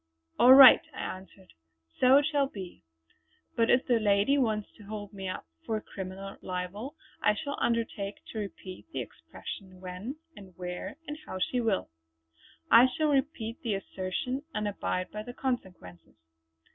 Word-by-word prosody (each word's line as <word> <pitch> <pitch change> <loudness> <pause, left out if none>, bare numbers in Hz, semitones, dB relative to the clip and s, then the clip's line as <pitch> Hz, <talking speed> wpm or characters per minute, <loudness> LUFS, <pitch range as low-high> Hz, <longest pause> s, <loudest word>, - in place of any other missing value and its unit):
'" 80 0 -40
"All 255 +2 +9
right" 270 -1 +11
I - - -7
answered 190 0 -8 0.5
"so 255 +2 +7
it 285 - +3
shall 290 -3 +2
be. 190 -8 -9 0.7
But 230 0 +2
if 250 +2 +4
the 240 -3 +3
lady 205 +5 +3
wants 220 -6 0
to 215 - -14
hold 205 0 -7
me 195 -1 -5
up 185 - -5 0.2
for 220 -1 -1
criminal 195 -1 -8
libel 190 - -5 0.3
I 210 - +3
shall 285 +5 -4
undertake 225 -4 -1 0.2
to 220 - -4
repeat 190 - -8
the - - -3
expression 185 -2 -9
when, 185 +8 -6 0.2
and 190 -3 -14
where, 180 +8 -6
and 295 0 -6
how - - -5
she 245 +7 0
will. 215 - 0 0.8
I 240 +3 +9
shall 305 +4 0
repeat 265 -5 -1
the 225 -6 -1
assertion 195 +7 -3
and 210 0 -1
abide 185 -2 -2
by 210 - -5
the 245 +3 -9
consequences." 180 - -5
210 Hz, 160 wpm, -29 LUFS, 190-250 Hz, 0.8 s, right